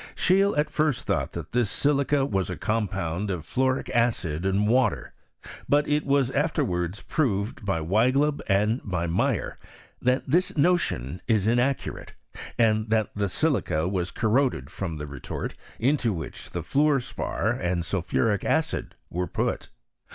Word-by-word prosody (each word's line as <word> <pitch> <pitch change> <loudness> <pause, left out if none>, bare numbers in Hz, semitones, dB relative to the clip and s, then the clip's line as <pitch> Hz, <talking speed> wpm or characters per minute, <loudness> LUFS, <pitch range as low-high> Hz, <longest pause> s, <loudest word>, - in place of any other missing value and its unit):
Scheele 195 0 +3
at 150 - +1
first 150 -4 0
thought - - -1
that - - -6
this 120 -4 +1
silica 140 +1 +2
was 95 -8 -1
a 90 - -4
compound 100 -4 -1
of 85 -5 -3
fluoric 130 - 0
acid 95 -8 0
and 100 +2 +2
water; 125 -1 +1 0.6
but 145 +1 +3
it 150 0 0
was 140 -2 +2
afterwards 115 - -1
proved 105 -10 -1
by 95 -4 0
Weigleb 130 - +2
and 105 +5 +2
by 90 -4 -2
Meyer, 85 +1 -1 0.4
that 125 +1 +2
this 175 +5 +1
notion 140 - +1
is 110 -4 +2
inaccurate, 120 +4 0 0.4
and 110 -1 +2
that 110 -1 +1
the 100 -1 0
silica 105 - 0
was 90 -2 -1
corroded 115 - 0
from 85 -5 -4
the 75 - -5
retort 70 -3 -5 0.2
into 125 -1 +2
which 80 -5 -7
the - - -4
fluor 145 0 +3
spar 120 - -2
and 90 -1 -1
sulphuric 100 +3 0
acid - - -1 0.2
were 90 +1 -2
put. - - -2
110 Hz, 145 wpm, -26 LUFS, 90-140 Hz, 0.6 s, Scheele